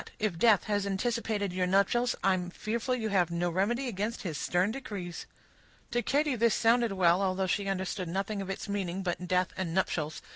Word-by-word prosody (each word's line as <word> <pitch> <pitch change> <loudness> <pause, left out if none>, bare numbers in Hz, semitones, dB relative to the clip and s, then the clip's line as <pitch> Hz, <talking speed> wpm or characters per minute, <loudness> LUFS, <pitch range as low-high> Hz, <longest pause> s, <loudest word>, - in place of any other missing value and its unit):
If 205 -6 -1
death 220 -2 +5
has 205 -2 -1
anticipated 205 -1 -1
your 180 0 0
nuptials, 200 +6 +2
I 195 - +4
am 180 -1 -2
fearful 225 +6 -2
you 220 -3 -2
have 180 -4 +2
no 170 +1 -1
remedy 235 +9 0
against 215 +1 -3
his 170 -6 -3
stern 180 +7 +1
decrees." 200 -9 -6 0.6
To 240 - +1
Katy 290 +1 +1
this 235 -1 +3
sounded 235 -1 +3
well, 180 -1 +4
although 190 0 +1
she 195 +2 -1
understood 190 -1 -2
nothing 195 +3 -2
of 195 - -6
its 195 - -4
meaning, 195 -2 -2
but 180 0 -3
"death" 180 +1 +1
and 180 -3 -3
"nuptials." 155 -5 -1
195 Hz, 190 wpm, -30 LUFS, 180-225 Hz, 0.6 s, death